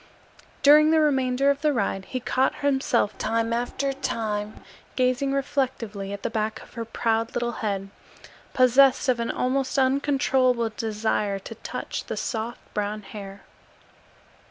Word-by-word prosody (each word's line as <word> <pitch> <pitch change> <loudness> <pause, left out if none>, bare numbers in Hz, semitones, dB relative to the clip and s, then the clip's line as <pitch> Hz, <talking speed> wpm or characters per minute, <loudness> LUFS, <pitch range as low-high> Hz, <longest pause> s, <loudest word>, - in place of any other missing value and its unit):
During 300 +2 +7
the 320 0 +4
remainder 270 -2 +2
of 280 0 -3
the 305 -1 +3
ride 195 -6 -1
he 255 - -4
caught 260 +2 +1
himself 265 -6 +1
time 230 +1 0
after 245 +3 -1
time 215 -6 -3 0.3
gazing 255 +2 +1
reflectively 255 -8 -2
at 200 0 -6
the - - -1
back 220 -1 -2
of - - -18
her 230 -1 -5
proud 225 0 -1
little 240 0 0
head, 195 -2 -2 0.6
possessed 260 +2 +5
of 250 -2 +2
an 230 - -2
almost 260 +2 -1
uncontrollable 260 -3 +2
desire 215 -2 -1
to 195 +4 -9
touch 225 - -6
the - - -5
soft 230 0 -3
brown 210 0 -2
hair. 195 -1 -9
240 Hz, 140 wpm, -25 LUFS, 215-270 Hz, 0.6 s, During